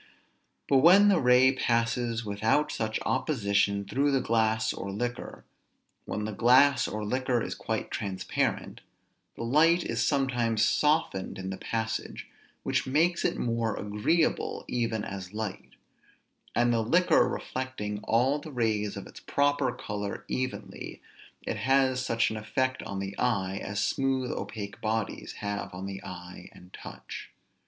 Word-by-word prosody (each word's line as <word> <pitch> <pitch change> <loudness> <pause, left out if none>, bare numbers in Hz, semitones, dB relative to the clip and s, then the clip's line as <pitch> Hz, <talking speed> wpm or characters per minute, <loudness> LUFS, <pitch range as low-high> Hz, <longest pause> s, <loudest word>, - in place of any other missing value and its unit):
But 135 - +4
when 185 +9 +7
the 190 -4 +4
ray 125 0 +6
passes 115 -2 0
without 110 +9 +1
such 110 -1 -2
opposition 100 -7 +1
through 140 +8 +1
the 135 -1 +2
glass 110 -2 +1
or 100 - -6
liquor, 120 +5 -4 0.6
when 105 - -3
the 110 - -3
glass 130 +5 +5
or 105 0 -4
liquor 130 +2 0
is - - -3
quite - - -4
transparent, 95 -2 -2 0.5
the - - -5
light 165 +8 +4
is - - -1
sometimes 120 -6 +1
softened 150 - +1
in 95 0 -5
the 95 - -5
passage, 110 -1 -3 0.4
which - - 0
makes 165 +6 +2
it - - 0
more 115 -2 -1
agreeable 105 +11 0
even 115 -3 -1
as 95 0 -7
light; 110 -3 -5 0.8
and 120 0 +3
the 115 - +2
liquor 175 +11 +4
reflecting 115 -6 -4
all 130 +6 +2
the 155 +1 -9
rays 110 -5 0
of - - -7
its - - -12
proper 145 -2 +1
color 105 -4 -5
evenly, 130 0 -4 0.4
it - - -3
has 130 -1 +2
such 115 -3 +1
an 110 - -4
effect 130 +5 -1
on 100 - -6
the 95 0 -4
eye, 100 -6 0
as 100 +1 -1
smooth 135 -2 0
opaque 100 -3 -6
bodies 110 -1 -2
have 100 -1 -4
on 95 +1 -6
the 95 0 -6
eye 90 -1 -9
and 90 +1 -16
touch. - - -9
115 Hz, 145 wpm, -28 LUFS, 105-130 Hz, 0.8 s, when